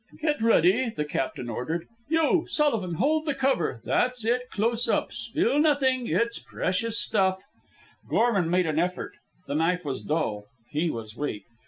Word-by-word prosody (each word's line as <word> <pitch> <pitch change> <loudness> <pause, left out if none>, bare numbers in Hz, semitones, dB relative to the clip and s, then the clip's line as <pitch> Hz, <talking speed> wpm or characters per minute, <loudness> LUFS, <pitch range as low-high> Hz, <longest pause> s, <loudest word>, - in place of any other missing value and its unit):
"Get 300 -5 0
ready," 225 +2 +4
the 150 -9 -3
captain 130 -4 -3
ordered. 160 +9 -3 0.2
"You, 325 +1 +2
Sullivan, 225 - +1
hold 310 - +1
the 290 - 0
cover 260 - 0
that's 250 -2 0
it 250 +2 0
close 230 +4 0
up. - - 0
Spill 285 - +1
nothing. 270 -5 +2
It's 235 0 0
precious 225 +5 -1
stuff." 190 0 +1 0.7
Gorman 210 -8 +2
made 180 +1 +2
an 155 -1 0
effort. 180 +1 -2 0.3
The 140 - -4
knife 165 +3 +1
was 135 -2 -3
dull. 110 -10 -2 0.3
He 160 +3 0
was 110 -5 -6
weak. 115 -9 -4
195 Hz, 155 wpm, -26 LUFS, 160-255 Hz, 0.7 s, ready